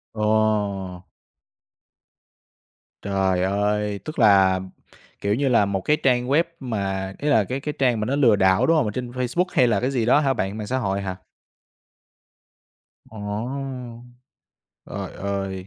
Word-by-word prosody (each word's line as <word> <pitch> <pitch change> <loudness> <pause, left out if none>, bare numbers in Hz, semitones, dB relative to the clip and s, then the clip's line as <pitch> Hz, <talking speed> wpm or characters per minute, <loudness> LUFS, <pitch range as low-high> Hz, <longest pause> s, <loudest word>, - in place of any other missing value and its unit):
Ồ! 105 -4 0 2.0
Trời 95 -2 0
ơi! 105 +1 0
Tức 155 -2 -6
là, 95 -4 +5 0.6
kiểu 100 +1 0
như 140 +1 0
là, 110 -4 +4
một 95 -1 -2
cái 150 +7 +2
trang 125 -2 +2
web 150 +5 +3 0.2
mà 95 -6 -3
ý 150 - -4
là 110 -5 +4
cái 130 +7 -4
cái 150 +1 -4
trang 125 -4 +2
mà 105 - -1
nó 135 +4 -1
lừa 120 -7 +4
đảo, 95 -1 +3
đúng 165 0 +3
hông? 145 - +2
Ở - - -2
trên 125 +1 -5
Facebook 125 +8 -1
hay 125 - +4
là 105 -4 +2
cái 130 +2 -1
gì 120 -4 0
đó 130 +4 +5
hả 135 -3 +1
bạn, 95 +1 -3
mạng 105 -1 -5
xã 130 - -1
hội 100 -4 -1
hả? 95 -1 -4 1.9
Ồ! 120 +3 -6 0.8
Trời - - -6
ơi. 95 -1 -4
105 Hz, 155 wpm, -23 LUFS, 100-125 Hz, 2.0 s, là